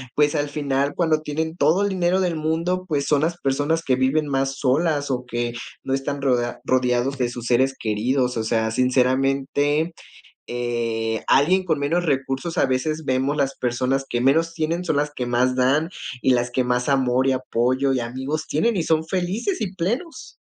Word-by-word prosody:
pues, 150 +1 +3
al 145 -1 0
final, 140 -1 -1
cuando 160 -3 +1
tienen 160 +2 -3
todo 180 +2 +3
el 205 - +1
dinero 185 0 +1
del 180 -3 0
mundo, 165 +4 -1
pues, 145 -4 0
son 145 -2 +3
las 170 +2 -1
personas 145 +4 0
que 130 - +2
viven 135 +4 +1
más 135 -1 -1
solas 145 +2 +1
o 125 -1 -2
que 120 -1 -3 0.3
no 135 - -2
están 140 +1 -3
rodea 125 -3 0
rodeados 125 +1 +1
de 125 -2 0
sus 120 -1 -7
seres 130 +2 +3
queridos. 125 +4 0
O 110 - 0
sea, 110 0 0
sinceramente, 135 +5 +1 0.6
eh, 115 -2 -2
alguien 185 +7 +4
con 160 -4 0
menos 165 +5 0
recursos 135 +2 -1
a - - +4
veces 155 +5 -1
vemos 135 +2 0
las 140 -2 0
personas 130 +2 0
que 120 - 0
menos 160 +6 +2
tienen 165 +2 -1
son 160 -4 0
las 145 +1 0
que 125 - -3
más 120 +1 +1
dan, 135 +5 +2 0.3
y 130 - +3
las 120 0 0
que 125 +1 0
más 125 +1 0
amor 130 -1 +2
y - - +4
apoyo 130 +1 0
y 130 - 0
amigos 130 +6 -4
tienen, 220 +9 +1
y 175 - +1
son 160 0 +1
felices 190 - -2
y 200 -4 -2
plenos. 235 - -3
135 Hz, 185 wpm, -22 LUFS, 125-160 Hz, 0.6 s, alguien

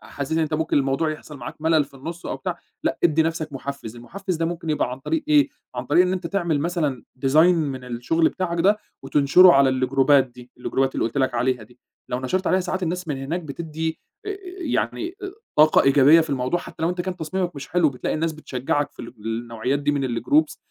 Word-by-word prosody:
أ - - -15
حاسس 140 +2 -5
إن 160 - +2
أنت 160 -1 0
ممكن 160 +1 0
الموضوع 140 +3 0
يحصَل 155 -1 -8
معاك 120 - -7
ملل 160 -2 +3
في 140 - -20
النص 165 +6 -7
أو - - -3
بتاع 180 -2 -4 0.2
لأ - - -1
ادّي 160 -1 +4
نَفْسك 160 -2 -3
محفز، 135 -4 -6
المحفز 185 +9 -5
ده 165 - -1
ممكن 165 -1 -3
يبقى 150 - 0
عن 130 - -6
طريق 320 - -2
إيه، 295 -1 +5 0.3
عن 125 0 -4
طريق 160 +5 +5
إن 180 - 0
أنت 185 -2 -3
تعمل 170 -6 0
مثلًا 155 -7 -1 0.2
design 155 +5 +6
من 140 -6 -2
الشغل 125 +7 +1
بتاعك 170 -2 -2
ده، 205 +4 +4 0.2
وتنشره 145 +6 +6
على 135 -2 +5
الجروبات 130 +1 +3
دي، 125 0 -15
الجروبات 135 +1 0
اللي - - 0
قُلت 115 +4 -3
لك 130 -2 +1
عليها 125 -1 0
دي. 125 +3 -17 0.3
لو 125 - -2
نشَرت 185 +8 -1
عليها، 185 - +3
ساعات 185 +1 -3
الناس 180 0 -2
من 145 - -1
هناك 140 +7 -3
بتدّي 160 +1 -4 0.3
آآ 405 -1 -3 0.2
يعني 335 +3 -1
أ - - -4 0.3
طاقة 155 +1 +6
إيجابية 140 +4 +6
في 160 - -2
الموضوع، 135 +6 0
حتى 160 - -10
لو 165 - +2
أنت 180 0 -3
كان 185 0 -3
تصميمك 175 +2 -3
مش 140 - -7
حلو، 175 -3 +3
بتلاقي 130 -3 -3
الناس 160 +1 -1
بتشجعك 145 -1 -2
في - - -10
الج 115 - -9
النوعيات 115 +4 -2
دي 145 0 0
من 140 -2 -1 0.2
الgroups، 305 +2 +2
155 Hz, 220 wpm, -23 LUFS, 135-170 Hz, 0.3 s, design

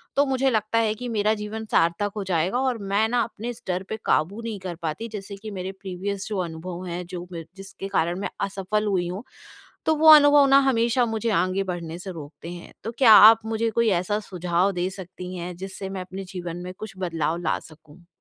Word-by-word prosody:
तो 285 - +4
मुझे 270 0 +1
लगता 220 -1 0
है 220 -2 +2
कि 250 +3 -6
मेरा 215 -1 +2
जीवन 215 +1 -5
सार्थक 170 +5 +2
हो 205 - -2
जाएगा। 185 +5 0
और 260 -2 0
मैं 200 +1 +1
ना 245 +1 +1
अपने 225 +1 -6
इस 240 - -7
डर 185 0 -1
पर - - -2
काबू 195 +9 +1
नहीं 225 -3 -5
कर 185 -2 -5
पाती 165 +8 -3
जैसे 200 -1 -6
कि 215 +2 -8
मेरे 190 -1 -4
प्रीवियस 195 +1 -4
जो 210 - -3
अनुभव 175 +2 -6
है, 175 +1 -4
जो 175 0 -7
मेर 165 -2 -6
जिसके 195 0 -8
कारण 175 -2 0
मैं 200 - -3 0.2
असफल 200 +2 -2
हुई 185 -3 +1
हूँ, 185 +5 -5 0.6
तो 315 - +4
वो 315 +1 +4
अनुभव 290 -1 +7
ना 275 +1 +7
हमेशा 235 0 +2
मुझे 225 0 -1
आगे 185 +1 0
बढ़ने 170 -3 -5
से 190 +1 -7
रोकते 155 0 -9
हैं। 175 - -10
तो 225 - -3
क्या 245 -5 +8 0.2
आप 225 0 +2
मुझे 225 +1 0
कोई 235 0 +2
ऐसा 205 +3 -1
सुझाव 180 +1 +1
दे 180 0 -1
सकती 185 -1 -8
हैं, 175 +1 -5
जिससे 190 +1 -6
मैं 195 -1 -4
अपने 185 +1 -7
जीवन 175 -2 -5
में 180 - -6
कुछ 215 -1 -7
बदलाव 165 -3 -1
ला - - +1
सकूँ? 160 +2 -17
195 Hz, 215 wpm, -24 LUFS, 175-220 Hz, 0.6 s, क्या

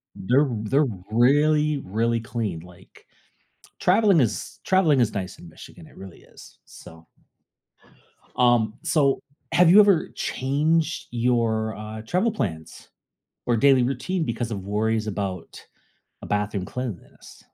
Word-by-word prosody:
They're 125 +10 +2 0.2
they're 140 +6 +2 0.2
really, 150 +5 +3
really 115 +4 0
clean, 110 -7 -4
like 90 +2 -18 0.7
traveling 195 -2 +4
is 120 -5 -2
traveling 170 -8 +3
is 115 -3 +1
nice 95 -3 -5
in 90 - -13
Michigan - - -14
it - - -19
really 95 -3 -11
is, - - -17
so. 80 0 -15 1.3
Um, 120 -3 +2
so 140 -4 +2 0.3
have 175 -1 +5
you 190 +4 +8
ever 200 -6 +4
changed 155 +4 -1
your, 115 -2 0
uh, 110 +1 -8
travel 185 - 0
plans 80 - -6 0.6
or 120 -1 +1
daily 135 0 +4
routine 150 +8 -2
because 115 -2 -3
of 100 -3 -5
worries 110 +2 -1
about 95 -4 -5 0.6
a - - -9
bathroom 105 -2 -2
cleanliness? 125 -8 -8
120 Hz, 125 wpm, -23 LUFS, 105-150 Hz, 1.3 s, you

